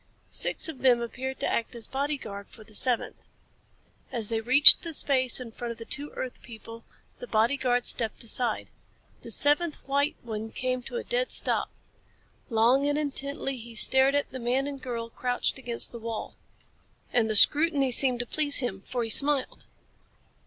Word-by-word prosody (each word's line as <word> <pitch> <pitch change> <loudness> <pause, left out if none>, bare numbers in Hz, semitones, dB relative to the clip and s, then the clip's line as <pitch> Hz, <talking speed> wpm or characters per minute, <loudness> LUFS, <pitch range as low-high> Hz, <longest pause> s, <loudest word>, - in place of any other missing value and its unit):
Six - - +1
of 315 -5 -7
them 250 -2 +3
appeared 260 +3 -6
to - - -1
act 235 +1 -3
as 235 - -7
bodyguard 265 -8 -5
for 220 - -16
the 215 0 -13
seventh. 245 +2 +1 0.9
As 225 -4 -2
they 225 -1 -2
reached 260 +5 +9
the 330 -2 -5
space 260 -4 +1
in 245 -3 -9
front 235 +1 -7
of - - -19
the 230 - -10
two 290 +5 -3
earth 255 - -7
people, 230 0 -12 0.4
the - - -9
bodyguard 245 - 0
stepped 225 -1 +1
aside. 235 0 -3 0.5
The - - -11
seventh 295 +2 +2
white 280 +2 -1
one 220 -1 -6
came 255 +2 -3
to 245 - -9
a - - -5
dead - - -2
stop. - - +3 0.8
Long 240 +5 +2
and 290 - -1
intently 280 -2 -4
he 235 -1 -11
stared 265 +5 +3
at 285 - -2
the 260 - -7
man 250 +3 -1
and 280 -1 -7
girl 235 -2 -6
crouched 250 +2 -2
against 240 -3 -3
the 235 - -9
wall. 225 -1 -7 0.8
And 230 -2 +1
the 215 - -1
scrutiny 290 +2 +5
seemed 250 -1 +3
to - - -6
please 290 +3 0
him, 195 -7 -1
for 245 -2 -4
he 225 - -5
smiled. 280 0 +2
255 Hz, 175 wpm, -26 LUFS, 230-280 Hz, 0.9 s, reached